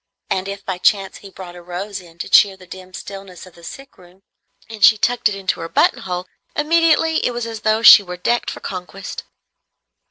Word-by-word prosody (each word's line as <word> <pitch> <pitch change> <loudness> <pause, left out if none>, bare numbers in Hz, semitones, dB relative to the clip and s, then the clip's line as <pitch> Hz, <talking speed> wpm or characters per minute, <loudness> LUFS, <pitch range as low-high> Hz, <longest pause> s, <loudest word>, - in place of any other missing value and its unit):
And 190 0 -1
if 200 0 -7
by 185 -2 -4
chance 195 -1 +1
he 200 - -13
brought 185 -2 -11
a 175 - -11
rose 190 +3 -6
in 170 -2 -18
to - - -6
cheer 195 -2 +5
the 185 - -16
dim 185 0 -12
stillness 195 -1 -10
of 185 - -17
the 170 - -18
sick 270 +9 -11
room, 180 +2 -20 0.4
and 220 -2 -7
she 215 - +7
tucked 235 0 +1
it 205 - -5
into 195 -1 -3
her 165 0 -6
buttonhole, 180 +1 0 0.3
immediately 325 +1 +2
it 245 - 0
was 240 -1 -4
as 225 -1 -6
though 215 +1 0
she 215 - +10
were 180 -2 -8
decked 240 +7 -1
for - - -8
conquest. 190 +1 -7
195 Hz, 210 wpm, -19 LUFS, 180-220 Hz, 0.4 s, she